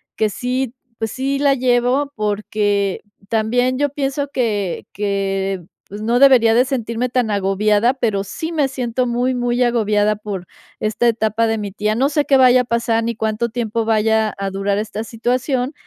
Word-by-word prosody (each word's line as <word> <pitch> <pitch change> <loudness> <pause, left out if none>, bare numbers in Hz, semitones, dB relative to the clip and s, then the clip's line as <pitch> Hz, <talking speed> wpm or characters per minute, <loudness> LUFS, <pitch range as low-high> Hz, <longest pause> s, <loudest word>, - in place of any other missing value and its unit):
que 215 -1 +1
sí, 250 +3 -2 0.3
pues 225 -1 -2
sí, 275 +1 -2
la 280 -1 +3
llevo 255 +3 +1
porque 205 -1 -1 0.3
también 245 +3 +1
yo 290 0 +2
pienso 280 0 -2
que 210 - -2
que, 195 -1 -1 0.3
pues, 205 +2 -8
no 230 +3 +1
debería 255 -5 +6
de 240 +2 +5
sentirme 245 -2 -2
tan 245 -2 0
agobiada, 205 +4 +2
pero, 220 -7 -1
sí 320 - -5
me 290 -4 +1
siento 255 -1 -2
muy, 245 +2 0
muy 245 0 0
agobiada 215 -3 +2
por 200 -4 -6 0.3
esta 215 +2 -1
etapa 225 0 0
de 225 0 0
mi 205 -2 -4
tía. 210 +1 -1
No 260 +4 +2
sé 295 0 +1
qué 275 - +4
vaya 255 -1 +6
a - - -2
pasar, 235 -1 0
ni 235 +1 -1
cuánto 220 +2 -1
tiempo 230 -1 -2
vaya 220 -1 +2
a 195 0 -2
durar 195 +1 -1
esta 215 +1 -3
situación, 250 +4 -1
230 Hz, 175 wpm, -19 LUFS, 210-250 Hz, 0.3 s, debería